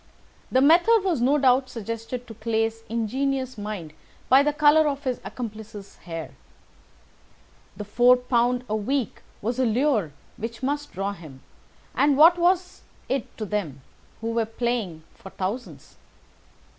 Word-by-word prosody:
The 260 - +4
method 350 +9 +5
was 350 -10 0
no 275 +4 +3
doubt 260 -1 +3
suggested 230 +2 -6
to 225 - -10
Clay's 225 +1 -1
ingenious 260 +3 -1
mind 205 -7 -6 0.4
by 265 +2 +7
the 295 +1 +2
colour 300 +1 +4
of 285 -1 -2
his 255 -3 -2
accomplice's 215 -1 -8
hair. 165 -2 -7 1.5
The 210 - -5
£ - - -24 0.3
4 250 0 +1
a 215 - -1
week 250 +4 -2 0.2
was 235 +4 -2
a 260 - +3
lure 225 - +1 0.3
which 225 +2 -6
must 290 +2 -2
draw 195 +2 -3
him, 155 -8 -13 0.5
and 285 -1 +3
what 335 +4 +7
was 360 +1 +1 0.3
it 265 -2 -3
to 215 - -4
them, 180 -10 -3 0.4
who 225 0 -2
were 230 -1 0
playing 225 -8 -3
for 195 - -12
thousands? 200 +7 -6
235 Hz, 145 wpm, -25 LUFS, 215-275 Hz, 1.5 s, by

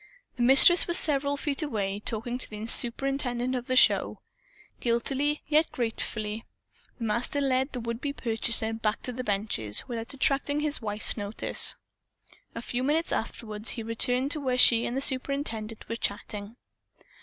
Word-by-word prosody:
The 245 - -5
Mistress 270 +8 +7
was 345 0 +10
several 285 -1 +2
feet 280 +1 -2
away, 205 -9 -3
talking 230 +3 -4
to - - -4
the 215 0 -7
superintendent 245 +1 -1
of 245 -1 -4
the 255 - -1
show. - - +4 0.6
Guiltily, 270 +5 -1
yet 310 +2 +2
gratefully, 220 -2 -4 0.5
the 235 - -7
Master 235 +6 -1
led 265 0 0
the 250 - -5
would 235 +1 -5
be 285 - -2
purchaser 225 -3 +1
back 225 -1 -3
to 250 - -5
the 255 +1 -5
benches, 195 - -1
without 235 +1 -5
attracting 285 +2 0
his 300 -2 0
wife's 210 0 -3
notice. 205 +1 0 0.8
A 230 - -6
few 245 +1 -3
minutes 305 +5 0
afterward 215 -1 -3
he 230 - -4
returned 245 +4 0
to 305 - -2
where 255 -3 -1
she 235 -2 +6
and 245 - -4
the - - -1
superintendent 255 -5 -1
were 230 - -4
chatting. 205 0 -5
245 Hz, 160 wpm, -27 LUFS, 225-275 Hz, 0.8 s, was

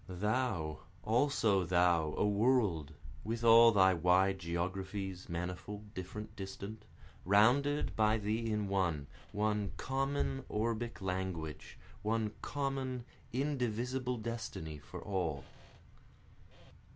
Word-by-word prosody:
Thou, 95 -5 -1 0.2
also 110 -5 +2
thou, 85 -3 +3
a - - +2
World, 100 - +2 0.3
With 115 +3 -3
all 115 0 +8
thy 95 -3 +5
wide 90 +3 +3
geographies, 95 +2 -3
manifold, 90 +5 -5
different, 105 +4 -7
distant, 100 +2 -7 0.4
Rounded 125 +10 +3
by 110 0 +3
thee 110 +2 -1
in 105 -1 0
one 90 -7 0 0.3
one 105 -1 0
common 135 0 -1
orbic 115 +1 -2
language, 90 -4 -4 0.2
One 110 0 0
common 135 -3 -2 0.3
indivisible 125 -1 -1
destiny 110 -9 -5
for - - -9
All. 85 -8 -2
105 Hz, 100 wpm, -34 LUFS, 90-115 Hz, 0.4 s, all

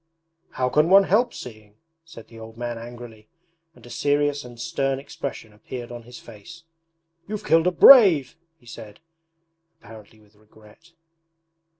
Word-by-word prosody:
'How 125 - -1
can 150 +5 +1
one 195 +1 +6
help 220 +6 +1
seeing?' 110 -3 -12 0.3
said 155 -9 -14
the 115 - -15
old 110 0 -13
man 120 -1 -6
angrily, 115 -2 -12 0.5
and 120 - -19
a 120 - -13
serious 145 0 -1
and 120 -1 -14
stern 135 +2 -2
expression 135 -5 -8
appeared 120 +3 -10
on 120 0 -9
his 125 - -12
face. 120 +10 -14 0.6
'You've 210 +1 -7
killed 165 +2 +2
a - - +2
brave,' 175 - +6 0.2
he 120 - -27
said, 110 -3 -12 0.8
apparently 110 -1 -16
with 105 -1 -26
regret. 110 +9 -22
120 Hz, 145 wpm, -22 LUFS, 110-150 Hz, 0.8 s, one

